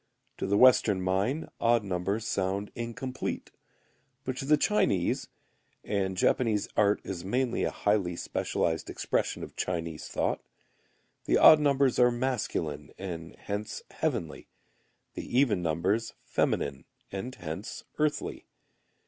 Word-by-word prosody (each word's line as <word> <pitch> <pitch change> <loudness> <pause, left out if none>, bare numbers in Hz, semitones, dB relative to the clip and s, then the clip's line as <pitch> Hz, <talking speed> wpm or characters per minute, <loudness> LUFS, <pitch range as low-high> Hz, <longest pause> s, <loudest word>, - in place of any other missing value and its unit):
To - - -1
the 100 +1 +2
Western 115 -6 +6
mind, 95 - 0
odd 115 -1 +3
numbers 100 +3 -2
sound 100 -1 -1
incomplete. 120 +2 -4 0.7
But 130 -1 -3
to 135 - -4
the 150 +2 +5
Chinese 100 - +1 0.6
(and 95 -2 -1
Japanese 110 0 +2
art 105 0 +3
is 90 -3 -5
mainly 125 +5 0
a - - +1
highly 100 -4 0
specialized 80 -1 -1
expression - - -1
of - - -9
Chinese 85 -3 -3
thought), - - -1 0.8
the - - +3
odd 155 - +9
numbers 140 -3 +3
are 125 0 +7
masculine 120 - -2
and 85 -4 -6
hence 105 +1 -5
heavenly; - - -2 0.7
the 120 - -3
even 115 -9 +3
numbers 90 +8 0
feminine 70 -1 0 0.3
and 120 +7 -5
hence 80 +8 -6 0.2
earthy. 150 -1 -1
105 Hz, 125 wpm, -29 LUFS, 95-125 Hz, 0.8 s, odd